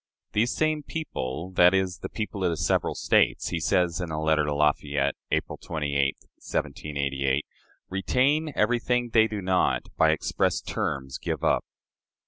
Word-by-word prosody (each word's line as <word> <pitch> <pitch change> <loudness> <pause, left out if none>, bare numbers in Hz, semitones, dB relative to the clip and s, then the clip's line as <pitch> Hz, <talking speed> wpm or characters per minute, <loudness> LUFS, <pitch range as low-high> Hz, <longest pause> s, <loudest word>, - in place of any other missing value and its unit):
These 115 +4 +1
same 155 -1 +1
people 90 - -5
that 90 0 +5
is, 95 -3 0
"the - - -6
people 105 -3 -4
of 90 - +3
the 85 - -2
several - - +1
States" - - +2
he 85 - -2
says, 85 +1 +1
in 90 - -3
a 80 -1 -3
letter 80 -1 +2
to 75 0 -1
Lafayette, 75 -1 +1 0.2
April - - -1
28, 70 -3 -1 0.2
1788, 70 -1 -2 0.4
"retain 135 +11 +1
everything 120 +2 +1
they 110 -1 +5
do 105 -3 -5
not, 95 0 +2
by 80 - +5
express 80 - +1
terms, 65 -1 -3
give - - -3
up." - - +2
90 Hz, 150 wpm, -26 LUFS, 75-110 Hz, 0.4 s, that